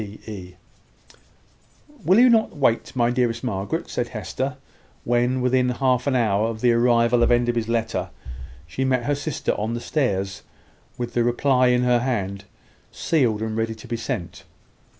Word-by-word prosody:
"PE." 100 Hz, -3 st, -9 dB, 1.5 s
"Will 185 Hz, +4 st, +4 dB
you 250 Hz, -, +7 dB
not 225 Hz, -8 st, +2 dB
wait, 130 Hz, -2 st, +1 dB
my 120 Hz, -1 st, +2 dB
dearest 120 Hz, -1 st, 0 dB
Margaret?" 115 Hz, -, -3 dB
said 120 Hz, -, -2 dB
Hester, 120 Hz, +6 st, -4 dB, 0.5 s
when, 120 Hz, +2 st, +1 dB
within 125 Hz, 0 st, +2 dB
half 125 Hz, +1 st, +1 dB
an 135 Hz, -, +1 dB
hour 110 Hz, -3 st, +2 dB
of 110 Hz, -1 st, -5 dB
the 125 Hz, -, +4 dB
arrival 120 Hz, 0 st, +3 dB
of 120 Hz, -, +3 dB
Enderby's 120 Hz, -1 st, +1 dB
letter, 110 Hz, -6 st, -1 dB, 0.6 s
she 80 Hz, +11 st, -3 dB
met 130 Hz, -2 st, +1 dB
her 145 Hz, -, 0 dB
sister 145 Hz, 0 st, -2 dB
on 110 Hz, +3 st, -2 dB
the -, -, -3 dB
stairs, 100 Hz, -9 st, -1 dB, 0.6 s
with 120 Hz, -1 st, -4 dB
the 120 Hz, -, +2 dB
reply 125 Hz, +2 st, +2 dB
in 125 Hz, 0 st, +3 dB
her 125 Hz, -1 st, +3 dB
hand, 100 Hz, -6 st, -2 dB, 0.5 s
sealed, 120 Hz, -9 st, 0 dB
and 110 Hz, -1 st, -3 dB
ready 115 Hz, 0 st, -1 dB
to 110 Hz, -, -13 dB
be 120 Hz, -, -2 dB
sent. 115 Hz, -, -5 dB
120 Hz, 160 wpm, -23 LUFS, 110-125 Hz, 1.5 s, you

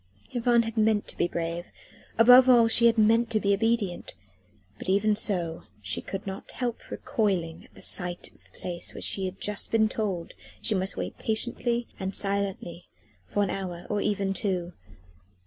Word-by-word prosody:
III 245 Hz, -, -1 dB
Yvonne 235 Hz, 0 st, +4 dB
had 225 Hz, 0 st, -6 dB
meant 215 Hz, -1 st, +2 dB
to -, -, -8 dB
be -, -, +1 dB
brave. 170 Hz, 0 st, -4 dB, 0.5 s
Above 250 Hz, +3 st, +8 dB
all 235 Hz, -2 st, +7 dB
she 235 Hz, +1 st, +6 dB
had 230 Hz, 0 st, +3 dB
meant 225 Hz, +2 st, +4 dB
to 220 Hz, -, +2 dB
be 200 Hz, -1 st, +2 dB
obedient. 210 Hz, -3 st, -1 dB, 0.6 s
But -, -, -6 dB
even 210 Hz, +2 st, +3 dB
so, 175 Hz, -6 st, -1 dB
she 95 Hz, -3 st, -2 dB
could 195 Hz, 0 st, -6 dB
not 195 Hz, 0 st, -6 dB
help 245 Hz, -2 st, -4 dB
recoiling 180 Hz, -7 st, -2 dB
at -, -, -12 dB
sight 180 Hz, -1 st, -2 dB
of -, -, -26 dB
the -, -, -22 dB
place 175 Hz, -1 st, -4 dB
where -, -, -7 dB
she 195 Hz, -, 0 dB
had 185 Hz, 0 st, -6 dB
just 210 Hz, -1 st, -1 dB
been 220 Hz, -1 st, +3 dB
told 200 Hz, -6 st, -3 dB, 0.3 s
she 225 Hz, -, 0 dB
must 190 Hz, -1 st, -1 dB
wait -, -, -5 dB
patiently 235 Hz, +1 st, -1 dB
and 190 Hz, 0 st, -3 dB
silently 195 Hz, -4 st, -2 dB, 0.4 s
for 205 Hz, -, 0 dB
an 195 Hz, -, -1 dB
hour, 180 Hz, -3 st, -5 dB
or 205 Hz, -1 st, 0 dB
even 200 Hz, -2 st, 0 dB
two. 180 Hz, -2 st, -2 dB
200 Hz, 180 wpm, -27 LUFS, 180-225 Hz, 0.6 s, Above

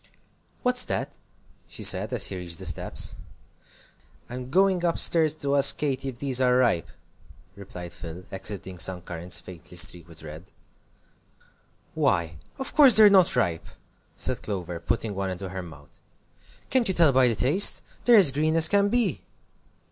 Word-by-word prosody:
"What's 250 Hz, 0 st, +2 dB
that?" -, -, -5 dB, 0.5 s
she -, -, -10 dB
said, -, -, +3 dB
as -, -, 0 dB
he -, -, -6 dB
reached 85 Hz, -2 st, -6 dB
the -, -, -6 dB
steps. -, -, -2 dB, 1.1 s
"I'm 125 Hz, 0 st, -8 dB
going 185 Hz, +2 st, +1 dB
up 170 Hz, -1 st, -1 dB
stairs 160 Hz, -2 st, +4 dB
to 140 Hz, -2 st, -3 dB
ask 140 Hz, -, +7 dB
Katy 135 Hz, -2 st, -4 dB
if 125 Hz, -, -11 dB
these 130 Hz, -1 st, 0 dB
are 125 Hz, -1 st, +2 dB
ripe," 115 Hz, -10 st, 0 dB, 0.7 s
replied 90 Hz, -3 st, -11 dB
Phil, 85 Hz, +1 st, -10 dB
exhibiting 95 Hz, -2 st, -8 dB
some 90 Hz, +1 st, +1 dB
currants 90 Hz, 0 st, -3 dB
faintly 90 Hz, 0 st, -13 dB
streaked 90 Hz, -2 st, 0 dB
with 80 Hz, -2 st, -12 dB
red. 80 Hz, +3 st, -11 dB, 1.5 s
"Why, 80 Hz, -3 st, -1 dB, 0.2 s
of 265 Hz, -, -6 dB
course 280 Hz, -6 st, +6 dB
they're 215 Hz, -2 st, +7 dB
not 190 Hz, -3 st, +3 dB
ripe!" 85 Hz, -4 st, -2 dB, 0.5 s
said -, -, -2 dB
Clover, 90 Hz, -4 st, -6 dB
putting 105 Hz, +5 st, -4 dB
one 95 Hz, 0 st, -4 dB
into 95 Hz, +1 st, -7 dB
her 95 Hz, +1 st, -7 dB
mouth. 80 Hz, -5 st, -16 dB, 0.7 s
"Can't 255 Hz, -3 st, +2 dB
you 190 Hz, -, -1 dB
tell 165 Hz, -4 st, +3 dB
by 130 Hz, -1 st, +3 dB
the 115 Hz, -, -1 dB
taste? 150 Hz, -, +4 dB, 0.2 s
They're 240 Hz, -, +5 dB
as 180 Hz, -9 st, +6 dB
green 155 Hz, +3 st, -1 dB
as 160 Hz, -1 st, +4 dB
can 200 Hz, 0 st, +1 dB
be." 225 Hz, -, -2 dB
120 Hz, 165 wpm, -24 LUFS, -, 1.5 s, ask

